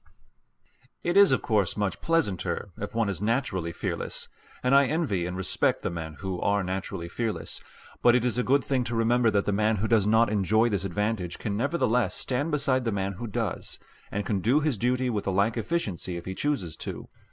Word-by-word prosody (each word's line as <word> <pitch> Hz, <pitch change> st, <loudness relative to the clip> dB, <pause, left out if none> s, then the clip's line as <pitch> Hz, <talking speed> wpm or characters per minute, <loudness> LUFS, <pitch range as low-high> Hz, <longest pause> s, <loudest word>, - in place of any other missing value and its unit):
It 175 Hz, +1 st, 0 dB
is 200 Hz, -4 st, +7 dB
of 130 Hz, -, +2 dB
course 105 Hz, -5 st, +1 dB
much 100 Hz, -3 st, -1 dB
pleasanter 105 Hz, -, 0 dB
if 105 Hz, +2 st, -6 dB
one 115 Hz, -2 st, +2 dB
is 100 Hz, -2 st, -3 dB
naturally 105 Hz, -7 st, 0 dB
fearless, -, -, -4 dB, 0.3 s
and 125 Hz, +2 st, +2 dB
I 140 Hz, -1 st, +6 dB
envy 120 Hz, -, 0 dB
and 90 Hz, +1 st, -4 dB
respect 95 Hz, -, +1 dB
the -, -, -1 dB
men 80 Hz, -2 st, -6 dB
who 95 Hz, -2 st, -3 dB
are 100 Hz, 0 st, +2 dB
naturally 95 Hz, -2 st, -4 dB
fearless. 110 Hz, +5 st, -3 dB, 0.4 s
But 120 Hz, 0 st, +6 dB
it 125 Hz, -1 st, +2 dB
is 125 Hz, -1 st, +1 dB
a -, -, +2 dB
good 135 Hz, +2 st, +3 dB
thing 130 Hz, -3 st, 0 dB
to 120 Hz, -, -3 dB
remember 115 Hz, +1 st, +3 dB
that 100 Hz, -2 st, +1 dB
the -, -, +1 dB
man 110 Hz, +2 st, +2 dB
who 105 Hz, +2 st, -1 dB
does 110 Hz, -3 st, +3 dB
not 110 Hz, +1 st, +4 dB
enjoy 110 Hz, +3 st, +3 dB
this 100 Hz, -3 st, -1 dB
advantage 100 Hz, -1 st, -2 dB
can 100 Hz, -2 st, -3 dB
nevertheless 125 Hz, -, +1 dB
stand 140 Hz, +5 st, -1 dB
beside 140 Hz, -4 st, +1 dB
the 115 Hz, -, 0 dB
man 100 Hz, -1 st, -1 dB
who 120 Hz, +5 st, -6 dB
does, 110 Hz, -3 st, -3 dB, 0.3 s
and 105 Hz, 0 st, -3 dB
can 100 Hz, -3 st, 0 dB
do 120 Hz, +10 st, +3 dB
his 150 Hz, -3 st, 0 dB
duty 125 Hz, +3 st, 0 dB
with 105 Hz, -3 st, -2 dB
the 95 Hz, -, 0 dB
like 100 Hz, +4 st, +2 dB
efficiency, 105 Hz, -, -2 dB
if 85 Hz, -, -8 dB
he 95 Hz, -, -4 dB
chooses 95 Hz, -, -2 dB
to. -, -, -6 dB
110 Hz, 210 wpm, -27 LUFS, 95-125 Hz, 0.4 s, is